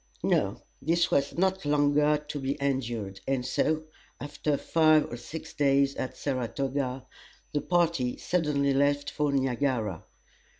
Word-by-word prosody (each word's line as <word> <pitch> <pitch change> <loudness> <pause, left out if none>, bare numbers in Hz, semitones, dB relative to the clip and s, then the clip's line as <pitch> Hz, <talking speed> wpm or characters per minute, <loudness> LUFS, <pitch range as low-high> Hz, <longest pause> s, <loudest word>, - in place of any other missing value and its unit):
No, - - +1 0.2
this 170 +4 +1
was 140 +2 +1
not 190 +1 +1
longer 145 0 +3
to 145 - -3
be 135 +1 -2
endured, 120 -8 -2
and 135 -2 0
so, 155 +4 0 0.4
after 150 0 -2
five 155 -1 +4
or - - -3
six 155 +7 -8
days 140 -1 +3
at 130 - -4
Saratoga, 130 0 -2 0.5
the 145 - +1
party 170 -8 +1
suddenly 150 -5 +1
left 145 +1 +1
for 150 -1 0
Niagara. 130 - 0
140 Hz, 130 wpm, -28 LUFS, 130-150 Hz, 0.5 s, five